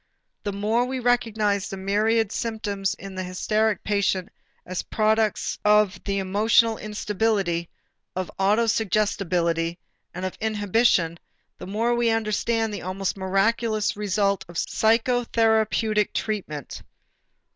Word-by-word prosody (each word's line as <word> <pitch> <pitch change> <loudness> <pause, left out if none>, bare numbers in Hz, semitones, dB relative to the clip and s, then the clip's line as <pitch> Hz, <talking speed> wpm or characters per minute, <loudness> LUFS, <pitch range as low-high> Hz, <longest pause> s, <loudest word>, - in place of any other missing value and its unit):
The 205 - -3
more 215 +5 +1
we 260 +1 -3
recognize 220 -5 +1
the 195 - -5
myriad 210 +3 +1
symptoms 210 -5 -2
in 195 0 -9
the 185 0 -4
hysteric 215 +3 0
patient 200 -2 0 0.4
as 185 0 -3
products 220 0 0
of 210 -2 +3
the 200 -1 -1
emotional 215 +4 +3
instability, 210 -5 -1 0.5
of 185 -1 -3
autosuggestibility 195 -5 +1 0.3
and 180 +2 -5
of 185 - -5
inhibition, 205 -5 +2 0.4
the 180 - -8
more 225 +5 0
we 240 -1 +2
understand 225 0 0
the 205 - -5
almost 185 +1 -2
miraculous 215 +3 +1
result 200 -1 0
of 175 - -13
psychotherapeutic 220 -1 +2
treatment. 180 - -4
210 Hz, 115 wpm, -24 LUFS, 190-225 Hz, 0.5 s, of